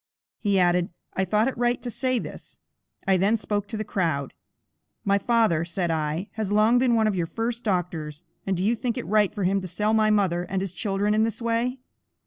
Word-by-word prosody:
He 200 -2 +1
added, 180 -1 +3 0.2
"I 190 - 0
thought 210 +5 +2
it 265 - -2
right 240 0 +2
to 245 - -4
say 255 +1 0
this." - - -8 0.5
I 190 -1 +4
then 200 +5 +3
spoke 205 -1 -2
to 220 - -5
the 215 - -2
crowd. 165 -10 -1 0.7
"My 200 0 +3
father," 220 -9 +2
said 170 0 -2
I, 160 +4 -2
"has 215 -3 -3
long 215 +4 +4
been 245 -2 +3
one 220 -1 +3
of 215 - +2
your 175 -3 -1
first 230 +5 -3
doctors, 175 -6 -2 0.2
and 190 -2 +1
do 185 - -1
you 230 +3 +3
think 240 +1 -2
it 250 - -4
right 210 -2 +3
for 210 -2 -4
him 195 +2 +2
to 185 - -5
sell 210 +5 0
my 215 -1 +4
mother 190 -5 +2
and 185 +2 -2
his 190 -2 -3
children 200 +2 0
in 215 - +3
this 225 0 -2
way?" 235 +2 0
205 Hz, 220 wpm, -25 LUFS, 180-225 Hz, 0.7 s, I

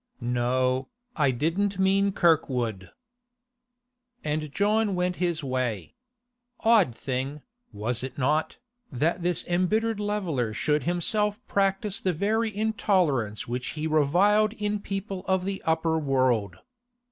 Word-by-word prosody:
'No, 125 +1 0 0.3
I 145 -4 +3
didn't 165 +10 0
mean 195 +1 +3
Kirkwood.' 125 - +1 1.3
And 150 0 -2
John 210 +2 +1
went 180 0 -1
his 170 -3 -1
way. 130 -6 -2 0.7
Odd 215 - +4
thing, 135 +3 -4 0.3
was 110 +3 -2
it 130 0 -6
not, 150 +4 0 0.3
that 160 +7 0
this 175 0 -1
embittered 210 +5 +1
leveller 180 - -1
should 150 +8 0
himself 205 +5 0
practise 195 0 0
the 185 - +1
very 220 +6 0
intolerance 180 - 0
which 125 +2 -3
he 150 - -2
reviled 185 +8 +3
in 210 -1 -2
people 195 -1 -5
of 190 -1 +1
the 195 0 -3
upper 160 0 +1
world. 130 -8 +1
165 Hz, 120 wpm, -26 LUFS, 130-200 Hz, 1.3 s, Odd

